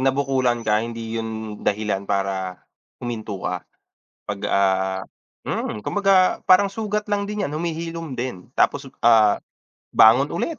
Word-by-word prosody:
nabukulan 130 -3 +1
ka 105 0 +2
hindi 115 0 -4
yun 110 -1 -6
dahilan 100 -1 -1
para 95 -2 -1 0.5
huminto 110 -4 -4
ka. 90 -1 -2 0.7
Pag, 100 -1 -3
ah, 95 -1 +1 0.5
mm, 105 - -2
kumbaga 195 - +2
parang 190 +2 +6
sugat 210 +1 -3
lang 205 -1 0
din 210 -1 -3
yan, 145 - -7
humihilom 165 -1 -4
din. 120 -8 -5
Tapos, 140 -1 +2 0.2
ah, 110 -3 +5 0.6
bangon 125 +6 +6
ulit, 325 -4 -2
115 Hz, 130 wpm, -22 LUFS, 105-165 Hz, 0.7 s, parang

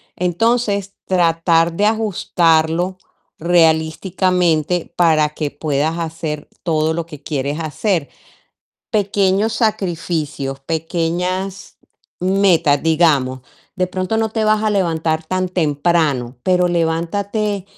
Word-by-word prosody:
Entonces, 200 +2 0
tratar 165 -2 +2
de 205 +4 +1
ajustarlo 175 -5 +1 0.4
realísticamente 170 0 +1
para 155 -3 +3
que 150 -1 -4
puedas 150 +2 -1
hacer 160 -2 -4
todo 160 -1 0
lo 165 0 -3
que 150 -4 -12
quieres 145 +1 -2
hacer. 160 +1 -1 0.8
Pequeños 200 +1 +1
sacrificios, 165 - -2
pequeñas 175 +5 -3 0.4
metas, 180 -6 +3
digamos, 150 -6 +2 0.3
de 185 -2 0
pronto 185 +4 -2
no 225 - +1
te 220 0 -1
vas 215 0 +2
a 215 - +2
levantar 165 -5 0
tan 185 +2 -1
temprano, 150 -6 0
pero 180 +1 +2
levántate, 185 +5 -1
170 Hz, 100 wpm, -18 LUFS, 160-190 Hz, 0.8 s, para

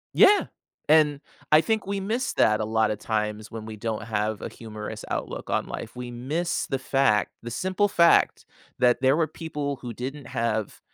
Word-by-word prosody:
Yeah. 410 +1 +6 0.4
And 150 -2 +5 0.3
I 155 - +8
think 220 -1 0
we 200 0 -2
miss 230 +6 -1
that 110 0 +3
a - - -1
lotta 110 -1 +1
times 105 0 -3
when 110 -1 -7
we 110 0 -7
don't 110 0 -3
have 105 -1 -2
a - - -4
humorous 110 -2 -8
outlook - - -4
on - - 0
life, - - -6
we 125 0 -6
miss 150 +9 -2
the 135 -2 -1
fact 130 -7 +2
the 120 - -6
simple 190 - +1
fact 170 -3 +4 0.3
that 125 0 +3
there 135 +3 +4
were 160 - +2
people 150 -4 -4
who 120 -2 -6
didn't 135 +3 -6
have 115 -4 -2
125 Hz, 180 wpm, -26 LUFS, 110-160 Hz, 0.4 s, I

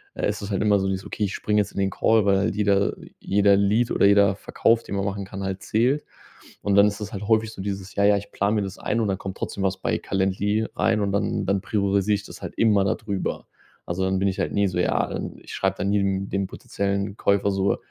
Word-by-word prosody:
äh, - - -1
ist 105 +1 -3
es 100 - -5
halt 95 - 0
immer 105 -2 +3
so 95 - -1
dieses: 95 0 -3
„Okay, 105 - -2
ich 100 - -4
springe 105 0 +1
jetzt - - -5
in - - -4
den 95 0 +2
Call“, 110 +3 +2
weil 95 -2 +2
die 105 +3 -1
da 100 0 +2 0.3
jeder 100 0 +3
Lead 105 +4 +2
oder - - +3
jeder 100 -1 +5
Verkauf, 115 +3 +1
den 100 - -5
man 100 - -1
machen 100 0 -3
kann, 95 0 -7
halt 95 +1 -3
zählt. 125 +8 +1 0.6
Und 100 - +1
dann 100 +1 +7
ist 105 +1 -3
es 105 0 -6
halt 100 0 -5
häufig 110 0 +2
so - - -8
dieses: 100 -1 -5
„Ja, 100 - +2
ja, 100 0 +5
ich 100 0 -8
plane 100 +2 0
mir 105 - +1
das 95 0 -6
ein“, 115 - -1
und 110 - 0
dann 95 - 0
kommt 95 -2 -7
trotzdem 100 - -4
was 95 0 0
bei - - -1
Calendly 100 +3 0
rein 115 -1 +2
und 100 -1 0
dann 100 - 0
dann 100 0 +1
priorisiere 100 0 +1
ich 100 - -6
das - - -11
halt - - -7
immer 105 -4 +4
da - - +1
drüber. 100 -4 -4 0.4
Also, 90 +2 -2
dann 95 0 +1
bin 100 0 +2
ich 95 - -4
halt - - -1
nie 100 -1 +2
so 90 -1 -2
ja, - - +1
ähm, - - -5
ich - - -10
schreibe - - -1
dann 100 - -1
nie 105 - +2
dem 95 0 -1
dem 100 -1 -1
potenziellen 100 +1 -3
Käufer 100 0 +2
so: 95 0 +1
100 Hz, 265 wpm, -24 LUFS, 95-105 Hz, 0.6 s, dann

